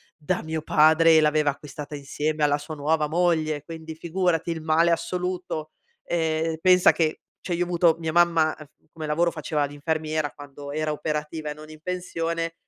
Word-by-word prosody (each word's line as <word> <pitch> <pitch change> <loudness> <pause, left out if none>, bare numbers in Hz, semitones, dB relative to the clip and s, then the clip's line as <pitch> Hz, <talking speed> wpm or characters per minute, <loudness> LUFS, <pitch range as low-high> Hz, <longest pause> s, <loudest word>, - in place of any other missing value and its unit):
da 170 +3 -2
mio 160 -1 -4
padre 160 +1 +5
e - - +6
l'aveva 150 -1 +3
acquistata 145 +1 -7
insieme 150 +2 -2
alla 145 0 +2
sua 155 +2 -8
nuova 150 +1 0
moglie, 160 -3 +1
quindi 160 -1 -8
figurati, 170 0 -1
il 160 -1 -4
male 160 +2 +3
assoluto. 180 -3 -3 0.3
Ehm, 160 -1 0
pensa 180 -1 +6
che 160 -2 0 0.2
cioè 175 -2 -2
io 175 - +1
ho - - -3
avuto 170 -2 +3
mia 160 -1 -3
mamma, 165 -2 +3
uhm, 155 - -11
f 145 - -27 0.2
come 160 -1 -6
lavoro 165 +3 +1
faceva 155 -2 -1
l'infermiera 155 +1 -2
quando 145 0 -10
era 155 0 -1
operativa 150 +1 -3
e - - -3
non 155 +1 -13
in 155 0 -13
pensione, 165 -2 -3
160 Hz, 180 wpm, -25 LUFS, 150-165 Hz, 0.3 s, e